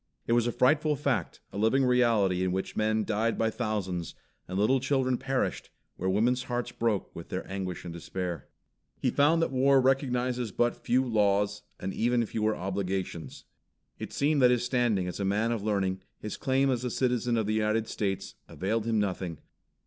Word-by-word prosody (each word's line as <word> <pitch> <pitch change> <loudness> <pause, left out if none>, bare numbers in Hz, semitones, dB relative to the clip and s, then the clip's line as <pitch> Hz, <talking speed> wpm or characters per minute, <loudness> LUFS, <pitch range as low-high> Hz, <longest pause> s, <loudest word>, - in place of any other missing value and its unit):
It 115 - +1
was 120 0 +3
a - - +1
frightful 150 +5 +3
fact, 130 - -1
a 100 - -4
living 130 +5 +3
reality 115 -7 +3
in 95 - 0
which 95 +1 -3
men 110 0 +1
died 110 +2 0
by 110 0 +1
thousands, 95 - -3 0.3
and 95 - -4
little 125 +7 +3
children 130 -1 +1
perished, 135 +1 -2 0.3
where 95 - -2
women's 120 +6 +2
hearts 120 0 -2
broke 115 -5 -1
with 85 - -9
their 90 - -4
anguish 95 -3 -4
and 85 - -6
despair. 85 -2 -5 0.5
He - - +1
found 160 +4 +4
that - - -1
War 135 +1 +4
recognizes 125 -3 +1
but 120 +4 +1
few 130 +2 +1
laws, 105 -2 +2 0.2
and 95 - -4
even 120 0 +1
fewer 110 0 0
obligations. 95 -2 -4 0.6
It - - -6
seemed 145 0 +1
that 125 - +7
his 125 -1 +2
standing 120 -7 +1
as 90 - -5
a - - -1
man 105 +4 +1
of 115 -3 -1
learning, 95 -3 0 0.2
his 105 - -5
claim 135 +1 +1
as 125 -1 -1
a 125 - -1
citizen 125 -1 0
of 110 - +1
the 105 - 0
United 110 +1 +1
States, 95 -2 -3
availed 110 +4 -2
him 115 -1 +1
nothing. 95 -5 -2
110 Hz, 185 wpm, -29 LUFS, 95-125 Hz, 0.6 s, that